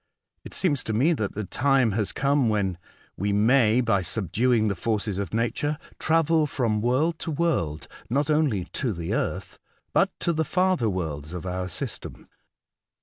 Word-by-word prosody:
It - - -9
seems 145 -8 +1
to 110 - -2
me 140 +10 +3
that 110 -10 -3
the 105 - -2
time 130 +2 +2
has 105 0 -1
come 140 -3 +2
when 95 -5 0 0.4
we 100 +2 0
may, 115 +3 +4
by 110 -5 +2
subduing 110 +5 +1
the 100 - +1
forces 105 0 -2
of 100 - -3
nature, 120 +7 -1 0.2
travel 160 -1 +3
from 115 -6 0
world 145 +8 +1
to - - -4
world; 140 - -1 0.2
not 140 +5 +1
only 150 - +1
to 120 +4 -3
the 85 -2 -3
earth, - - -3 0.3
but - - +4
to 170 - +1
the 160 0 +1
farther 180 -7 +1
worlds 80 -4 -4
of 90 - -6
our 90 0 -3
system. 90 - -6
115 Hz, 165 wpm, -25 LUFS, 100-145 Hz, 0.4 s, may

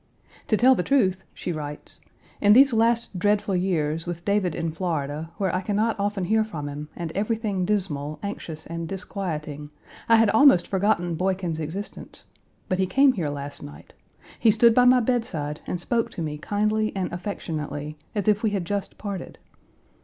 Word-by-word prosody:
"To 215 - +2
tell 255 +4 +6
the 225 - 0
truth," 190 -6 +2
she - - -5
writes 150 -2 -7 0.4
"in 205 0 +6
these 270 +2 +7
last 230 -3 +1
dreadful 205 0 +1
years, 165 -4 0
with 170 0 -5
David 200 -5 +1
in 165 -1 -2
Florida, 160 -3 -3
where 190 -3 0
I 185 - 0
can 200 +2 -2
not 220 +2 +1
often 200 -2 -1
hear 220 +4 +3
from 160 -9 -6
him, 145 +1 -6
and 170 -2 -4
everything 210 -1 -1
dismal, 155 -7 -2
anxious, 165 -6 -6
and 170 0 -5
disquieting, 155 -6 -5 0.4
I 230 - +7
had 225 -2 +5
almost 220 -8 +6
forgotten 190 -3 +1
Boykin's 180 -1 -1
existence, 165 +7 -7 0.4
but 185 - -1
he 190 - +2
came 270 +5 +5
here 170 -9 -2
last 145 0 -6
night; 75 0 -11 0.5
he 225 - +4
stood 225 +2 +5
by 250 +1 +5
my 250 0 +6
bedside 220 - -2
and 180 - -2
spoke 230 +6 0
to 170 - -4
me 150 -1 -4
kindly 215 +4 0
and 185 -3 -2
affectionately, 155 -5 -4 0.2
as 205 -1 -1
if 210 0 +3
we 220 - +2
had 200 -4 -2
just 200 +2 -3
parted. 200 -4 -6
190 Hz, 175 wpm, -25 LUFS, 160-215 Hz, 0.5 s, these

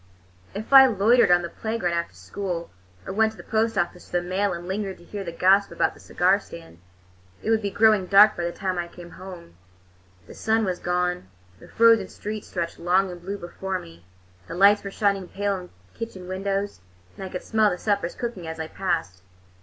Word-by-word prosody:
If 215 +6 -5
I 265 -1 +10
loitered 230 +1 +4
on 175 0 +4
the 170 - -4
playground 220 -5 -2
after 170 - -3
school, 170 - -5 0.3
or - - -5
went 220 +1 +2
to - - -18
the - - -10
post 225 0 0
office 180 -2 -2
for 180 - 0
the - - -7
mail 195 +2 0
and 175 0 -6
lingered 195 0 -3
to - - -17
hear 200 +3 -6
the 170 - -5
gossip 195 +4 +3
about - - +1
the - - -18
cigar 185 +3 +2
stand, 165 - -13 0.6
it 220 - 0
would 220 -1 +3
be 200 - -2
growing 215 -2 +3
dark 205 +2 +7
by 175 - -3
the 170 - -1
time 185 0 -3
I 175 - -3
came 175 0 -12
home. 185 - -11 0.7
The - - -12
sun 220 0 +1
was 185 -2 -2
gone; 180 - -1 0.3
the - - -14
frozen 230 -4 +4
streets 210 +2 -7
stretched 170 -1 -4
long 185 +2 +2
and 175 -1 -10
blue 195 +3 -5
before 190 +1 -4
me; 85 - -13 0.4
the 165 - -6
lights 200 +3 +5
were 200 - -5
shining 195 -2 0
pale 200 +1 -1
in 180 -1 -11 0.2
kitchen 195 -6 -7
windows, 195 - -3 0.3
and - - -8
I 190 - -5
could 180 - -6
smell 220 -1 +3
the 180 - -3
suppers 200 -3 -1
cooking 230 -9 -5
as 160 0 -6
I 160 0 -4
passed. 165 - -2
190 Hz, 210 wpm, -24 LUFS, 175-205 Hz, 0.7 s, I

